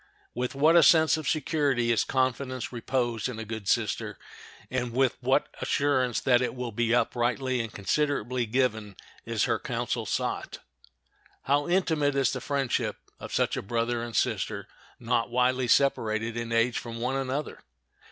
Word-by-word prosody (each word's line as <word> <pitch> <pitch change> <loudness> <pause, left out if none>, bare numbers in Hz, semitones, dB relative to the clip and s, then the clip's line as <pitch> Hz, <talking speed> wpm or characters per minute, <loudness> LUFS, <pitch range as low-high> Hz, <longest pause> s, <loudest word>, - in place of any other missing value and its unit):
With 125 +2 -3
what 155 +4 +4
a 170 - +8
sense 160 -2 +6
of 155 -1 -3
security 145 -7 +1
is 115 - +3
confidence 130 -1 -1
reposed 120 -1 -1
in 125 - -6
a 115 - -5
good 110 -2 -6
sister, - - 0 0.5
and 125 -2 -2
with 130 0 +2
what 130 +3 +2
assurance 130 -4 +1
that 125 -2 +4
it 125 - -2
will 125 -2 -4
be 115 +1 0
uprightly 125 +1 +1
and 115 -1 -5
considerately 125 +1 -1
given 110 -4 0 0.3
is - - 0
her - - +1
counsel - - -3
sought! - - -2 0.9
How 145 +2 +1
intimate 160 -6 +1
is 135 -2 +2
the - - -4
friendship 140 -3 -1 0.2
of - - -8
such - - +1
a - - -3
brother 115 +3 -1
and 115 -1 -6
sister - - -1 0.3
not 120 0 0
widely 125 +1 +1
separated 115 -3 +2
in 115 0 -4
age 115 +1 +2
from 115 -1 -7
one 125 +3 -1
another! 135 +2 -3
125 Hz, 160 wpm, -27 LUFS, 115-135 Hz, 0.9 s, a